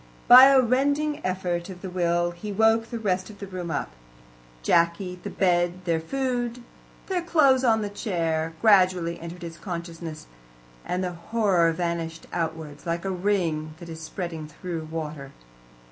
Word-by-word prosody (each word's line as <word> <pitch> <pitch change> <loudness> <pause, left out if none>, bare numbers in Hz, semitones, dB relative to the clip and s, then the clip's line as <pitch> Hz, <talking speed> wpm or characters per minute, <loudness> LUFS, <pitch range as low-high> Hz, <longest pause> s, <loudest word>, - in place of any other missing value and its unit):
By 255 +2 +11
a 275 -1 +6
rending 285 +4 +1
effort 180 -1 -2
of 180 -1 -10
the 190 - -4
will 175 -1 +1
he 190 +5 -7
woke 225 +2 +3
the 235 - -4
rest 185 -3 -1
of 210 - -12
the 200 - -7
room 185 -3 -6
up. 145 - -3 0.7
Jacky, 170 - +1
the - - -5
bed, 175 -1 +1
their 165 -2 +1
food, 245 +4 -2 0.4
their 370 -2 -1
clothes 280 -6 +4
on 220 -3 +3
the - - -2
chair, 165 -6 -2
gradually 185 -5 +4
entered 170 +1 -8
his 165 -1 -8
consciousness, 170 -3 -6 0.6
and 180 +1 -2
the 180 - -2
horror 175 -1 +2
vanished 165 -1 -3
outwards, 160 -3 -4
like 170 +2 -2
a 195 - -1
ring 175 -5 -1
that 170 -1 -11
is 160 0 -8
spreading 165 -2 -5
through 165 +1 -6
water. 150 -4 -6
180 Hz, 160 wpm, -25 LUFS, 165-210 Hz, 0.7 s, By